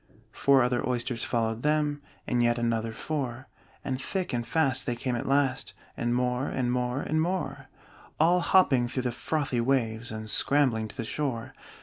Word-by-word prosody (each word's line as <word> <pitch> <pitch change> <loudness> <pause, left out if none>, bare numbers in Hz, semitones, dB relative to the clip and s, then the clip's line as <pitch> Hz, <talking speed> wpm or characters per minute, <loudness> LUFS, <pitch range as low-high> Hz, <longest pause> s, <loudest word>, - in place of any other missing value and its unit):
Four 135 -2 +4
other 125 0 0
Oysters 120 -1 -1
followed 115 -1 -1
them, 150 0 +1 0.2
And 120 -1 +1
yet 120 0 +3
another 115 -1 0
four; 130 0 -4 0.4
And 130 -1 -2
thick 185 +4 -3
and 120 -1 -2
fast 140 -6 +1
they 120 - 0
came 125 +1 -2
at 120 - -3
last, 140 -1 +1 0.2
And 120 0 0
more, 125 +1 0
and 125 -2 -1
more, 125 +2 -1
and 155 0 0
more 180 +2 -2 0.5
All 170 +3 +5
hopping 150 -9 +4
through 130 +1 -3
the 125 - 0
frothy 135 -1 -1
waves, 115 -3 0
And 110 0 -6
scrambling 120 -2 +2
to 120 - -13
the 115 - -3
shore. 130 -4 -3
125 Hz, 175 wpm, -28 LUFS, 120-145 Hz, 0.5 s, All